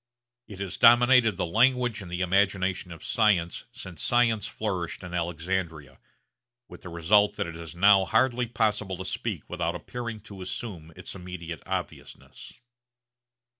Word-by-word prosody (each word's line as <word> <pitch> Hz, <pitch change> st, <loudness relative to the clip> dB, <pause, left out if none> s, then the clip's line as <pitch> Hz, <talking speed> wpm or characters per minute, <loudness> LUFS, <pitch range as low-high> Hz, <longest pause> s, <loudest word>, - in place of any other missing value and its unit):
It 100 Hz, -4 st, -10 dB
has 100 Hz, -2 st, -4 dB
dominated 120 Hz, -3 st, +6 dB
the 95 Hz, -, 0 dB
language 120 Hz, +4 st, +2 dB
and 95 Hz, -, -9 dB
the 90 Hz, +1 st, -3 dB
imagination 95 Hz, 0 st, +1 dB
of 80 Hz, -, -10 dB
science 100 Hz, -7 st, +1 dB
since 90 Hz, -3 st, -9 dB
science 115 Hz, -3 st, +2 dB
flourished 95 Hz, -6 st, -4 dB
in 90 Hz, -1 st, -8 dB
Alexandria, 85 Hz, -3 st, -3 dB, 0.7 s
with -, -, -13 dB
the 90 Hz, -, -9 dB
result 95 Hz, +5 st, +3 dB
that -, -, -2 dB
it 85 Hz, -1 st, -7 dB
is 85 Hz, 0 st, -9 dB
now 100 Hz, +1 st, +5 dB
hardly 120 Hz, +4 st, +2 dB
possible 105 Hz, -4 st, -1 dB
to 95 Hz, -, -6 dB
speak -, -, -4 dB
without -, -, -2 dB
appearing 120 Hz, -3 st, -6 dB
to 100 Hz, -1 st, -11 dB
assume 90 Hz, -4 st, -6 dB
its -, -, -9 dB
immediate 90 Hz, -4 st, -8 dB
obviousness. -, -, -7 dB
95 Hz, 145 wpm, -27 LUFS, 85-110 Hz, 0.7 s, dominated